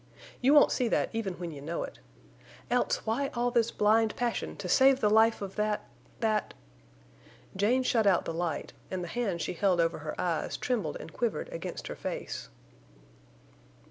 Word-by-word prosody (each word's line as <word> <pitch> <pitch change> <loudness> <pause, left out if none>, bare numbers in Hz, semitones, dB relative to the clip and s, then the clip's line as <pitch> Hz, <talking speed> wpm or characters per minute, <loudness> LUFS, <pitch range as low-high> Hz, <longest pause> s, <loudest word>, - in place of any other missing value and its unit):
You 270 +4 +5
won't 290 - +7
see 250 - +1
that - - +1
even 210 -5 -2
when 175 -1 -5
you 145 -2 -9
know 165 +4 -3
it. - - -9 0.7
Else, 245 0 +1
why 240 +5 0
all 240 +1 +1
this 235 -2 +2
blind 215 +1 +3
passion 240 -1 -2
to 195 - -5
save 265 +7 +5
the 210 -4 +2
life 220 0 +4
of 195 -1 -6
that—that...." 215 +1 -2 1.0
Jane 230 +7 +2
shut 230 -4 +2
out 185 -3 +3
the - - -3
light, 165 -3 -3 0.2
and 185 -1 -3
the - - -5
hands 195 -5 -2
she - - -2
held 180 0 +2
over 165 -1 +1
her 150 0 -6
eyes 170 -3 -1
trembled 210 -12 -1
and 160 - -10
quivered 235 -3 -2
against 170 +2 -6
her - - -5
face. - - -5
210 Hz, 175 wpm, -30 LUFS, 175-235 Hz, 1.0 s, won't